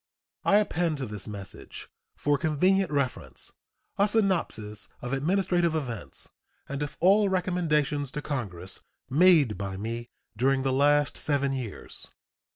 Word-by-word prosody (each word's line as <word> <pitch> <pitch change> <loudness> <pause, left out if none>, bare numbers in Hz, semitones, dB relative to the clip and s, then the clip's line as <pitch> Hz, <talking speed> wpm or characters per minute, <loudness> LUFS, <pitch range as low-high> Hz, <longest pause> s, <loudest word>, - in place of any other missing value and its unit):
I - - +4
append 175 -6 +2
to 135 - -3
this 105 -3 -7
message, 100 -2 -8 0.3
for 145 0 +1
convenient 180 +4 +2
reference, 140 -3 -2 0.5
a 200 - +5
synopsis 165 - +1
of 125 +1 -4
administrative 175 +3 +1
events 115 - -4 0.4
and 140 +1 -4
of 145 - -4
all 200 +3 +5
recommendations 155 -6 +1
to 150 - -3
Congress 95 - -4 0.3
made 150 - +5
by 100 -1 -4
me 115 +3 -4 0.3
during 135 +3 +2
the 135 -1 +1
last 145 +1 +3
seven 140 -2 +1
years. 125 -6 -6
145 Hz, 130 wpm, -28 LUFS, 120-175 Hz, 0.5 s, a